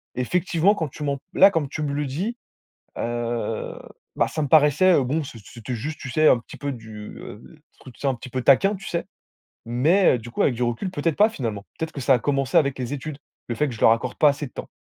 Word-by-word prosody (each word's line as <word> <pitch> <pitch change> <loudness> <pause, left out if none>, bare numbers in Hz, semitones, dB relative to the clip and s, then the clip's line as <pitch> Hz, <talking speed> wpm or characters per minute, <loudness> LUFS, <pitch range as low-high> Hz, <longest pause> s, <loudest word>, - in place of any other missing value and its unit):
effectivement, 175 +7 +2
quand 160 -7 -2
tu 150 - -8
m'en 140 -1 -1
p 135 - -24
là, 195 - +7
comme 160 -6 0
tu 150 +2 -4
me 140 -1 -2
le 145 0 -1
dis, 185 - -3 0.6
heu, 120 -2 -3 0.4
bah, - - +1
ça 155 - -4
me - - 0
paraissait, 155 +5 +5
heu, 140 - +4
bon, 145 +5 -1
c'ét 115 -4 -10
c'était 120 +3 -7
juste, 150 +7 -5
tu 135 - -7
sais, 155 +3 +4
un - - +5
petit 115 - -12
peu 145 -1 -3
du, 110 -4 -8
heu, 105 - -10 0.4
truc, 130 - -13
tu - - -21
sais, - - 0
un 135 - +2
petit 125 +1 -10
peu 130 - -2
taquin, 195 +11 +4
tu 195 - -11
sais, 170 - -2 0.6
mais, 135 +6 +3
du 120 +1 -10
coup, - - -2
avec 125 - +2
du 125 - -1
recul, 120 +10 -2
peut-être 165 -2 -1
pas 210 +2 +5
finalement, 110 - -4
peut-être 160 0 -3
que 140 - -6
ça 135 - +4
a - - -1
commencé 135 +1 +1
avec 140 -3 +2
les 125 0 -3
études, 145 +1 -6 0.3
le - - 0
fait 150 - +1
que 125 - -5
je - - -12
leur - - +7
accorde 120 +2 -1
pas 150 - +6
assez 145 +1 -2
de - - -18
temps. - - -7
140 Hz, 260 wpm, -23 LUFS, 120-155 Hz, 0.6 s, là